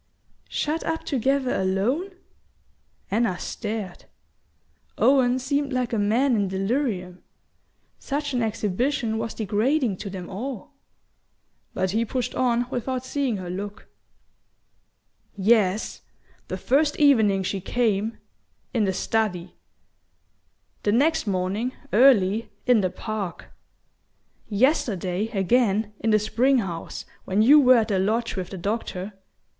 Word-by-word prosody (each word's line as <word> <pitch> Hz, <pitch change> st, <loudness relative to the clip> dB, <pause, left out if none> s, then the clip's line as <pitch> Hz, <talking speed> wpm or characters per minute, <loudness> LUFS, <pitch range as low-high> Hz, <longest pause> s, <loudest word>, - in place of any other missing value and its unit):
"Shut 310 Hz, +2 st, -1 dB
up 325 Hz, 0 st, -2 dB
together 270 Hz, 0 st, 0 dB
alone?" 200 Hz, -, 0 dB, 1.0 s
Anna 205 Hz, -4 st, +1 dB
stared. 210 Hz, -4 st, -5 dB, 0.9 s
Owen 255 Hz, -2 st, +4 dB
seemed 280 Hz, +2 st, -1 dB
like 250 Hz, -1 st, -1 dB
a 225 Hz, -, +1 dB
man 235 Hz, +6 st, +2 dB
in 205 Hz, -2 st, +1 dB
delirium; 190 Hz, -2 st, -2 dB, 0.8 s
such 285 Hz, 0 st, -3 dB
an 245 Hz, -, +1 dB
exhibition 225 Hz, +2 st, -1 dB
was 225 Hz, 0 st, -4 dB
degrading 220 Hz, +2 st, 0 dB
to 200 Hz, -, -6 dB
them 185 Hz, -2 st, -7 dB
all. 240 Hz, +5 st, -6 dB, 1.0 s
But 185 Hz, -1 st, 0 dB
he 225 Hz, +3 st, +1 dB
pushed 245 Hz, +1 st, -3 dB
on 245 Hz, -1 st, +1 dB
without 255 Hz, +1 st, -3 dB
seeing 265 Hz, -5 st, -1 dB
her 180 Hz, -2 st, -6 dB
look. 205 Hz, +3 st, -7 dB, 1.5 s
"Yes 205 Hz, 0 st, +2 dB, 0.5 s
the -, -, -4 dB
first 290 Hz, +2 st, +2 dB
evening 220 Hz, -10 st, +4 dB
she 195 Hz, +1 st, -2 dB
came, 220 Hz, 0 st, 0 dB, 0.6 s
in 225 Hz, -4 st, +2 dB
the 190 Hz, -, 0 dB
study; 185 Hz, -4 st, -1 dB, 1.3 s
the 205 Hz, -, +1 dB
next 285 Hz, +3 st, +2 dB
morning, 200 Hz, +6 st, -1 dB, 0.2 s
early, 220 Hz, -3 st, +4 dB, 0.2 s
in 245 Hz, -4 st, +4 dB
the 185 Hz, -, +1 dB
park; 205 Hz, -2 st, -5 dB, 1.0 s
yesterday, 205 Hz, -, +1 dB
again, 210 Hz, 0 st, +1 dB
in 225 Hz, -, 0 dB
the 215 Hz, -, +5 dB
spring 240 Hz, +6 st, +2 dB
house, 175 Hz, -7 st, -4 dB, 0.2 s
when 200 Hz, +3 st, +2 dB
you 290 Hz, +6 st, +8 dB
were 255 Hz, -3 st, +6 dB
at 225 Hz, -1 st, +1 dB
the 195 Hz, -3 st, +1 dB
lodge 225 Hz, +5 st, 0 dB
with 185 Hz, -2 st, -4 dB
the 195 Hz, -, -7 dB
doctor... 200 Hz, 0 st, -3 dB
220 Hz, 120 wpm, -24 LUFS, 195-255 Hz, 1.5 s, you